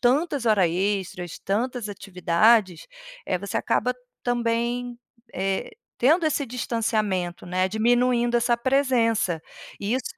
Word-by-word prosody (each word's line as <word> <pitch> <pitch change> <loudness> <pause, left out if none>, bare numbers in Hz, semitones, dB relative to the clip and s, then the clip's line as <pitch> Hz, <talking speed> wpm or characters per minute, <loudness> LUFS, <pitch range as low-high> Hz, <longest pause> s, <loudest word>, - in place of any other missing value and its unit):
tantas 275 +1 +1
hora 210 -5 +4
extras, 185 -1 -2
tantas 235 +3 -2
atividades, 190 +1 +2 0.4
eh, 185 - 0
você 200 +2 -4
acaba 250 - 0 0.3
também, 240 0 -1 0.4
eh, 195 - -2 0.3
tendo 315 +7 +4
esse 290 -2 0
distanciamento, 215 -7 -2
né, 185 +1 0
diminuindo 240 +2 +2
essa 235 0 +2
presença 235 - +1 0.4
e 205 +3 -1
isso 260 -1 -2
230 Hz, 110 wpm, -24 LUFS, 195-245 Hz, 0.4 s, hora